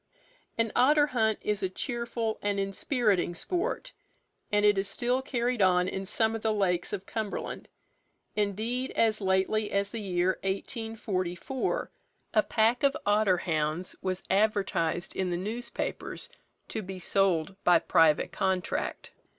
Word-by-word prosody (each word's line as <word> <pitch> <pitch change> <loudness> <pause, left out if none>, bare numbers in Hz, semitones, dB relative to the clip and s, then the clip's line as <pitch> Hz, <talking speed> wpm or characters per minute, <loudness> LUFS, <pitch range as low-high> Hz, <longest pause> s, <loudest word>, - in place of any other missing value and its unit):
An 230 -1 +1
otter 290 +4 +5
hunt 220 -6 +1
is 210 -1 0
a 190 - 0
cheerful 235 +1 -3
and 205 -1 0
inspiriting 195 -2 0
sport, 405 - -2 0.6
and 205 0 +3
it 205 0 +6
is 195 - -1
still 245 +5 0
carried 245 -3 -1
on 180 -1 +4
in 190 0 -4
some 220 +2 +1
of 225 - -4
the 220 - +1
lakes 185 -4 0
of 195 -2 -4
Cumberland. 220 -2 -4 0.7
Indeed, 220 +5 -1
as 220 -2 +2
lately 190 +3 +1
as 200 0 0
the 230 - -4
year 185 -1 0
1844, 215 - -2 0.4
a 215 - +5
pack 225 +3 +2
of 280 -1 +3
otter 205 -2 +3
hounds 160 +1 -1
was 185 -1 -2
advertised 190 -4 +1
in 190 -1 0
the 175 - -1
newspapers 220 +7 -4 0.4
to 220 - -3
be 190 -1 -7
sold 190 -1 +1
by 175 -1 +6
private 160 -2 +3
contract. 185 -1 -2
205 Hz, 140 wpm, -29 LUFS, 185-225 Hz, 0.7 s, it